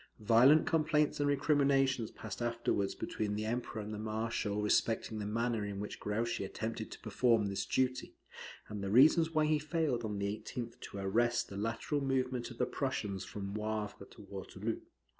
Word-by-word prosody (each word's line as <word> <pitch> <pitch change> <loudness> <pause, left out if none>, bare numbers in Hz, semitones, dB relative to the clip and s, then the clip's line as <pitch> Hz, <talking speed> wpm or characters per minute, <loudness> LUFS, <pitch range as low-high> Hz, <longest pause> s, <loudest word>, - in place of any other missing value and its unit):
Violent 120 +8 +6
complaints 155 -2 +2
and 145 0 +2
recriminations 140 -4 +2
passed 105 -1 -8
afterwards 115 -4 0
between 105 -1 -2
the 105 +1 -2
Emperor 110 -1 -3
and 105 +1 -6
the 105 - -5
marshal 110 -1 -2
respecting 110 +1 +1
the 105 - -3
manner 115 0 0
in 100 -1 -4
which 105 - -5
Grouchy 110 +1 -1
attempted 110 +3 -4
to - - -9
perform 115 -4 +2
this 100 0 -2
duty, 130 -1 0 0.5
and 105 -2 -5
the 100 - -2
reasons 155 - +6
why 155 -1 +2
he 155 0 +2
failed 150 -5 0
on 105 -2 -3
the 100 - -1
18th 115 +3 -5
to - - -8
arrest 120 +5 +1
the 100 - -8
lateral 115 +8 -1
movement 130 -2 0
of 125 - -10
the - - +2
Prussians 105 -8 -2
from 100 -1 -6
Wavre 105 -1 -3
to 105 - -13
Waterloo. 100 +2 -5
115 Hz, 175 wpm, -34 LUFS, 105-130 Hz, 0.5 s, Violent